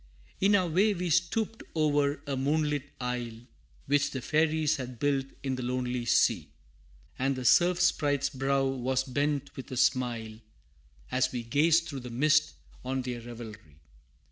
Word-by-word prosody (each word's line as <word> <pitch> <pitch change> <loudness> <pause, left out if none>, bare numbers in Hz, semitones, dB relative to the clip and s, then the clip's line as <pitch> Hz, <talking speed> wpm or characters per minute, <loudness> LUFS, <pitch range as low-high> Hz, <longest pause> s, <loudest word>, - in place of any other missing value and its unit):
In 200 +2 +4
our 185 -3 +2
way 195 +6 +2
we 175 -1 -2
stooped 205 +7 0
o'er 145 -2 +1
a 140 -2 -2
moonlit 145 +1 0
isle, 125 -2 -4 0.5
Which 145 0 +2
the 130 -2 -5
fairies 155 0 +2
had 125 -2 -6
built 135 +1 0 0.2
in 135 -1 -1
the - - -4
lonely 125 -1 -2
sea, 115 - +2 0.7
And 135 +1 +1
the 130 -1 -5
Surf 175 +6 +5
Sprite's 145 -5 +1
brow 135 0 0
was 130 0 0
bent 140 +1 -2
with 130 - -8
a 130 - -4
smile, 120 -4 0 0.7
As 130 0 +1
we 120 -2 -4
gazed 160 +8 +3
through 140 -3 -5
the 125 -1 -8
mist 155 +5 +2 0.3
on 130 0 -2
their 125 -2 -4
revelry. 110 -9 -10
135 Hz, 155 wpm, -29 LUFS, 125-155 Hz, 0.7 s, Surf